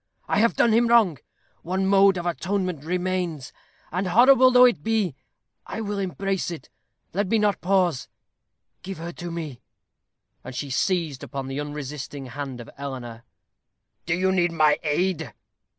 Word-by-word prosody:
I - - +1
have 230 +2 +3
done 230 - +3
him 235 +1 +4
wrong. 220 - +4 0.4
One 190 +3 -1
mode 195 0 +5
of 175 - -4
atonement 180 -2 -2
remains; 180 -4 -2 0.4
and, 185 +3 -1
horrible 255 +7 +6
though 250 0 +7
it 245 - +2
be, 215 -9 0 0.5
I - - -5
will 205 -2 -3
embrace 190 +1 -2
it. 170 -2 -8 0.4
Let 200 +2 0
me 225 - +2
not 210 -2 +1
pause. 180 -6 +1 0.7
Give 190 +1 -7
her 170 +2 -6
to 175 0 -7
me." 155 -7 -6 0.8
And 125 - -8
she 140 +2 -4
seized 160 -2 0
upon 135 -1 -5
the 135 +1 -4
unresisting 145 -1 -6
hand 135 0 -6
of 120 - -10
Eleanor. 120 -5 -7 0.8
"Do 175 - +2
you 190 +1 +1
need 175 -2 +2
my 155 -2 +3
aid?" 160 - -1
175 Hz, 155 wpm, -24 LUFS, 145-195 Hz, 0.8 s, though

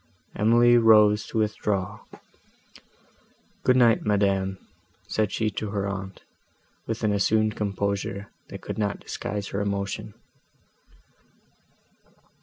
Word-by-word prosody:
Emily 120 +3 +5
rose 105 -2 +5
to - - -5
withdraw. 105 -3 -1 1.6
"Good 125 - +3
night, 120 -3 +4
madam," 100 -2 +1 0.5
said 105 -2 0
she 110 -1 -1
to 105 +1 -4
her 100 -1 -2
aunt, 95 -1 -6 0.6
with 115 0 -4
an 105 -1 +2
assumed 110 +2 +2
composure, 100 -1 -3 0.2
that - - -8
could - - -6
not 100 -1 -1
disguise 100 0 -5
her 100 - -3
emotion. 100 -1 -3
105 Hz, 105 wpm, -25 LUFS, 100-110 Hz, 1.6 s, Emily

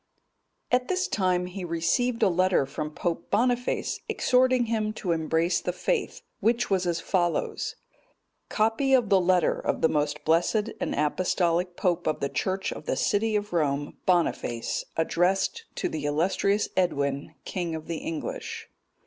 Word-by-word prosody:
] - - -49
At 250 0 +2
this 370 +2 0
time 185 -3 +1
he 180 +1 -6
received 205 +9 0
a - - +6
letter 185 -4 +2
from 150 +3 -4
Pope 170 -2 -3
Boniface(217) 245 +3 0
exhorting 255 -1 +3
him 215 -2 -1
to 185 -5 -3
embrace 165 +2 +1
the 180 - -1
faith, 445 - -2 0.2
which 235 0 +1
was 185 -2 +2
as 170 -1 0
follows: 175 -1 -1 0.7
COPY 225 +5 +2
OF 240 -5 +2
THE 195 -2 +5
LETTER 180 -2 +2
OF - - -2
THE 160 - +4
MOST 150 0 -1
BLESSED 190 +7 +2
AND - - -1
APOSTOLIC 175 +3 +1
POPE 175 -2 0
OF 155 - 0
THE 140 - -1
CHURCH 190 +7 -1
OF - - -10
THE - - +1
CITY 215 +1 +1
OF 205 -2 -2
ROME, 145 -3 0
BONIFACE, 170 -9 0
ADDRESSED 185 - +1
TO - - -1
THE 150 -2 -4
ILLUSTRIOUS 185 +7 +1
EDWIN, 140 -6 0
KING 175 -3 -3
OF 160 0 -7
THE 165 - -3
ENGLISH. 165 -2 -5
180 Hz, 155 wpm, -27 LUFS, 165-215 Hz, 0.7 s, a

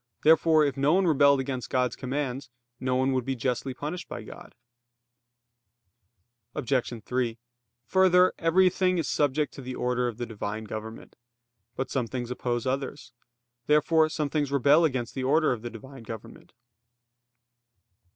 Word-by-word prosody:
Therefore 160 -1 +5
if 140 - -1
no 140 +3 +3
one 190 0 +3
rebelled 140 -3 +4
against 130 -2 -4
God's 125 -2 0
commands, 130 -1 -4 0.3
no 130 -1 -1
one 130 +1 +2
would 130 -1 0
be 135 +2 -2
justly 125 +2 -2
punished 155 +7 -6
by - - -6
God. - - -12 2.0
Obj. 125 -4 -1
3: 125 -2 -1 0.5
Further, 185 +5 +4
everything 185 +2 +3
is 165 - -1
subject 145 0 0
to - - -9
the 130 0 -6
order 125 0 0
of 115 -3 -5
the 120 - -3
Divine 110 -1 -5
government. 110 +1 -8 0.6
But 130 - -4
some 125 -4 -1
things 125 0 -5
oppose 120 -1 -2
others. 135 +2 -4 0.5
Therefore 155 +1 +4
some 150 -3 -2
things 145 -3 -1
rebel 140 +4 +4
against 130 -6 -2
the 130 - -4
order 155 +4 +3
of 120 -3 -3
the 120 - -5
Divine 130 +3 -11
government. 110 -1 -10
135 Hz, 150 wpm, -27 LUFS, 125-150 Hz, 2.0 s, Therefore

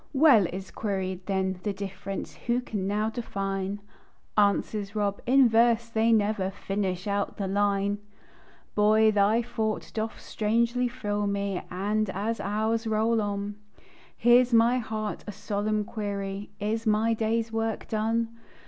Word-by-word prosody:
"Well," 265 - +6
is 190 +2 -7
queried 190 -3 -3
then, 190 -2 0
"the 205 +1 -2
difference 195 0 -6
Who 240 +1 +2
can 205 -6 -3
now 210 +2 0
define?" 195 -3 -3 0.5
Answers 205 0 +1
Rob: 200 -1 -1
"In 265 0 +6
verse 230 0 +3
they 225 0 +2
never 210 -3 +2
Finish 195 -1 -3
out 200 -1 -1
the 200 - -2
line!" 200 +1 +1 0.7
Boy, 215 +1 +5
thy 210 +3 +3
thought 220 -2 -3
doth 220 0 -3
strangely 235 +3 0
thrill 205 -4 -2
me, 200 -2 -1
And 205 +3 -1
as 215 +5 -2
hours 220 +3 -1
roll 220 +1 +2
on, 205 0 -3 0.6
Hears 240 +2 +5
my 235 +2 +5
heart 215 -2 -4
a - - -3
solemn 210 +1 -1
query: 200 -1 -4
Is 220 +2 -2
my 215 +2 +3
day's 225 0 0
work 225 0 -2
done? 225 +1 0
210 Hz, 140 wpm, -27 LUFS, 200-225 Hz, 0.7 s, Well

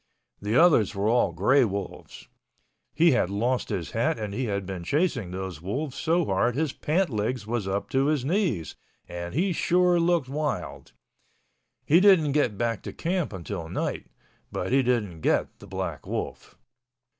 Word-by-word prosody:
(The 105 +3 -1
others 135 - +5
were 100 +1 0
all 120 +2 +3
gray 135 +1 +3
wolves.) 100 -3 -5 0.7
He 165 +2 +5
had 120 -8 +2
lost 120 +6 -1
his - - -3
hat - - 0
and 105 -2 -4
he 125 +5 -2
had 100 -3 -2
been 95 -2 -5
chasing 140 - 0
those 95 -2 -6
wolves 130 - -3
so 165 +4 +1
hard 115 +4 +1
his 150 -1 -1
pants 170 +2 0
legs 110 +1 -2
was 110 -3 -2
up 100 +1 -2
to 135 +1 +2
his 150 -4 0
knees 150 - 0 0.3
and 85 +2 -6
he 180 +4 +1
sure 180 +1 +3
looked 170 -4 +2
wild. 145 +2 -4 0.9
He 165 +4 +5
didn't 185 -7 +5
get 135 -8 +1
back 115 0 -1
to - - -7
camp 175 -1 -2
until 90 -3 -6
night—but - - -5
he 135 +1 +4
didn't 110 -10 -1
get - - 0
the - - -13
black - - -5
wolf. - - -5
125 Hz, 165 wpm, -26 LUFS, 100-155 Hz, 0.9 s, others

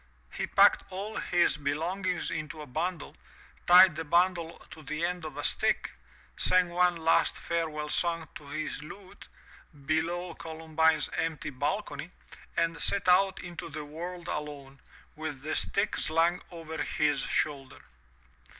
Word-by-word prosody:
He - - -3
packed - - +5
all 200 +4 -5
his 175 -4 +2
belongings 165 +6 -2
into 155 0 -5
a - - -9
bundle, 165 +6 -3 0.5
tied 180 -1 +8
the 160 - -3
bundle 170 +1 +1
to 160 - -10
the 155 +3 -2
end 175 -1 -3
of 155 - -7
a - - -4
stick, - - +1 0.4
sang 185 -1 +3
one 180 0 +3
last 165 0 +2
fare 170 -1 -1
well 150 0 -5
song 165 +1 0
to 145 - -11
his 150 0 -4
lute, 190 +5 -12 0.6
below 170 +3 -1
Columbine's 160 -1 0
empty 160 -2 -2
balcony, 150 +7 -3 0.5
and 165 -1 0
set 200 -2 +1
out 190 +1 +4
into 175 -1 -7
the 150 -1 -6
world 170 +3 -7
alone, 140 -2 -6 0.4
with 150 -3 -6
the 155 - -2
stick 200 +1 +1
slung 165 +3 +2
over 160 -2 -6
his 150 -2 +1
shoulder. 135 -1 -2
165 Hz, 140 wpm, -29 LUFS, 150-175 Hz, 0.6 s, tied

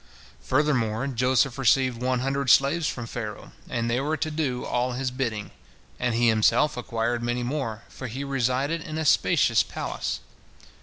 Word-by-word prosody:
Furthermore, 130 -5 +1
Joseph 130 0 +1
received 130 -1 +2
one 125 0 0
hundred 135 0 -1
slaves 140 +7 +4
from 120 - -4
Pharaoh, 110 -2 -6 0.2
and 115 -1 -1
they 120 +2 +1
were 155 +3 -1
to 155 - -2
do 140 -5 -2
all 125 +1 0
his 130 +1 -2
bidding, 115 -5 -3 0.5
and 125 -2 0
he 120 +1 +3
himself 115 +7 +3
acquired 120 -1 -2
many 120 +1 -1
more, 120 -4 -3
for 130 - -8
he 130 +5 -5
resided 135 +4 0
in 155 +1 -6
a 160 - -2
spacious - - +4
palace. - - -4
125 Hz, 160 wpm, -26 LUFS, 120-140 Hz, 0.5 s, slaves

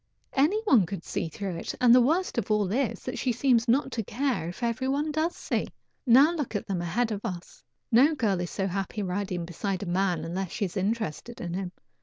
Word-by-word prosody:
Any 310 +11 +3
one 245 - +4
could 190 -2 -5
see 165 - -3
through 185 +1 -5
it, - - -5
and 245 -2 +6
the 250 - +7
worst 320 +2 +1
of - - -5
all 210 -3 +1
is 260 +2 -1
she 255 - -1
seems 240 -1 +2
not 265 +3 +2
to 225 - -2
care 245 - -1
if 185 +7 -8
every 235 +3 0
one 290 +3 0
does 315 +3 0
see. - - -2 0.4
Now 270 +7 +7
look 295 -9 -3
at 205 - -2
them 185 -3 -2
ahead 225 +8 0
of 205 -1 -3
us! 180 -6 -7 0.3
No 275 +7 +5
girl 205 -9 0
is 175 - -3
so 195 - -2
happy 195 +2 -3
riding 180 -2 -2
beside 185 +3 -3
a - - -4
man 175 -2 0
unless 180 +2 -3
she 205 - -2
is 180 - -7
interested 215 +2 -2
in 175 -1 -4
him. 185 -1 -3
215 Hz, 220 wpm, -27 LUFS, 185-255 Hz, 0.4 s, the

